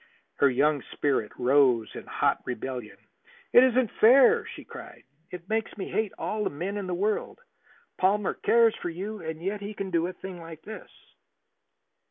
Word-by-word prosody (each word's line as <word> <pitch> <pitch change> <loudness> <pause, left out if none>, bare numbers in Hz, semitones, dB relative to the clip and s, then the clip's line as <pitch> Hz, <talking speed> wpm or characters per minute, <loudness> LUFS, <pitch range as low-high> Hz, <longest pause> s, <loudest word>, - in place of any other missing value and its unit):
Her 140 - +4
young 145 +3 +2
spirit 135 -7 0
rose 125 -3 +3
in - - -9
hot - - 0
rebellion. 125 -4 -6 0.6
"It 245 - +9
isn't 255 -2 +2
fair!" 275 - +6
she - - -9
cried. - - -11 0.3
"It 180 0 -9
makes 220 0 -2
me 195 - -5
hate 215 -2 -1
all 215 0 -2
the - - 0
men 180 +8 -4
in 200 -2 -4
the 180 - -2
world. 210 +4 -1 0.6
Palmer 195 +1 +2
cares 230 -1 +3
for - - -5
you, 195 +5 -6
and 160 0 -6
yet 200 +2 -3
he 205 +1 -6
can 195 -1 -5
do 170 0 +1
a 185 - -6
thing 180 -1 -9
like 165 -1 -11
this!" 220 - -9
185 Hz, 175 wpm, -27 LUFS, 145-215 Hz, 0.6 s, It